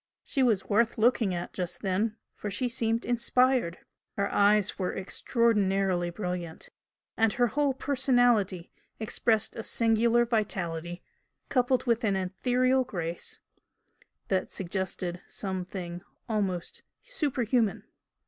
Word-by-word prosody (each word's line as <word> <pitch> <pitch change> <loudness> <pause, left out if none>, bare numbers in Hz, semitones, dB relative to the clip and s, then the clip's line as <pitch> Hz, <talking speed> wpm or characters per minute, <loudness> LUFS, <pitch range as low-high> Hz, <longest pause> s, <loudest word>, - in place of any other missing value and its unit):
She 270 - 0
was 225 -7 +3
worth 230 +3 +2
looking 225 -2 +3
at 175 - -5
just 180 -2 -4
then, 205 +3 0 0.2
for 210 - -5
she 205 +6 -1
seemed 230 -1 -1
inspired. 245 -5 +2 0.4
Her 200 0 0
eyes 205 0 +3
were 185 - -1
extraordinarily 195 -4 +1
brilliant, 175 -2 -5 0.5
and 225 -1 +3
her 245 -2 +3
whole 280 +2 +1
personality 245 -9 +2 0.3
expressed 220 0 0
a - - -4
singular 230 +1 +3
vitality 175 -7 -2 0.5
coupled 250 0 +2
with 235 -1 +1
an 200 -3 +2
ethereal 250 +8 +1
grace 170 -7 -5 0.9
that 190 -1 0
suggested 185 -1 -3
some 190 -2 -4
thing 175 -2 -6 0.3
almost 195 -6 -2 0.2
superhuman. 255 - 0
215 Hz, 115 wpm, -28 LUFS, 185-240 Hz, 0.9 s, was